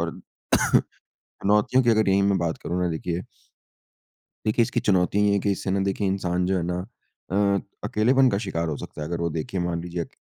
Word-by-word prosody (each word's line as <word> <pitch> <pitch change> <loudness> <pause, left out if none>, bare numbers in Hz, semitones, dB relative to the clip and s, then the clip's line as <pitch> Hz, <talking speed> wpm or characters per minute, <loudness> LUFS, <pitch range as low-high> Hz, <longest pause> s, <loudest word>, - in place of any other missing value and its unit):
और 85 0 -1 1.1
चुनौतियों 105 +6 +1
की 120 - +3
अगर 110 -3 +3
यहीं 100 +1 +3
मैं 100 -1 +3
बात 85 -1 -1
करूँ 90 +1 -2
ना 90 - +1
देखिए 85 +2 -3 1.2
देखिए, 110 +2 +3
इसकी - - 0
चुनौती 95 +1 +2
ये - - +3
हैं 100 - +2
कि, 100 - 0
इससे 95 0 -3
ना 100 +1 +1
देखिए 100 +1 -1
इंसान 90 -2 0
जो 95 0 +1
है 85 - -1
ना 90 +1 -2 0.5
अ, 100 0 +2 0.2
अकेलेपन 130 +5 +3
का 100 - 0
शिकार 85 -6 -2
हो 75 - -2
सकता - - -9
है। - - -3
अगर 85 0 -3
वो 85 - 0
देखिए 85 +4 -3
मान 85 -1 -1
लीजिए 90 0 -4
अक - - -9
95 Hz, 210 wpm, -25 LUFS, 85-100 Hz, 1.2 s, की